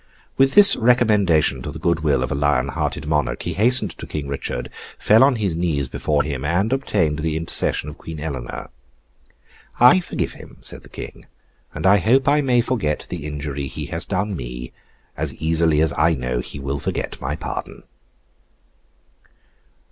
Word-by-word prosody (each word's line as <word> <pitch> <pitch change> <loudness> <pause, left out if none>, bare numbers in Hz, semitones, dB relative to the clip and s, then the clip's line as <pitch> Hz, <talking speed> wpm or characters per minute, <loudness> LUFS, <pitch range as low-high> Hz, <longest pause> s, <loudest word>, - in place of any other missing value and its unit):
With 135 0 +3
this 205 -1 +10
recommendation 105 - +3
to 75 - -6
the 80 - -7
good 85 +1 0
will 75 -5 +1
of - - -4
a - - +1
lion 70 -1 +1
hearted - - -3
monarch, 75 -6 -1
he 85 - -3
hastened 120 +8 +3
to - - -7
King 75 -2 -5
Richard, 70 -3 -5 0.3
fell 110 +4 +5
on 135 -1 +4
his 100 -7 -1
knees 80 -5 -1
before 75 +2 0
him, 70 -3 -4
and 90 - 0
obtained 90 - 0
the 80 0 -1
intercession 80 -2 -1
of 75 - -9
Queen 80 -1 -8
Eleanor. 70 -7 -6 1.1
'I 125 +10 +7
forgive 180 - -3
him,' - - -13
said - - -5
the - - -14
King, - - -10 0.4
'and 80 +2 -6
I 100 +2 +6
hope 125 +8 +2
I 145 +1 +4
may 125 -3 +2
forget 115 -12 -2
the 80 -4 -5
injury 70 -2 -4
he - - -6
has 85 - -4
done 95 +1 -2
me, - - -7 0.4
as - - -2
easily 80 -1 +1
as 80 -2 +1
I 85 -1 +3
know 60 -2 -3
he 65 - -7
will 70 +1 -3
forget - - -4
my - - -2
pardon. - - -6
80 Hz, 175 wpm, -21 LUFS, 70-105 Hz, 1.1 s, this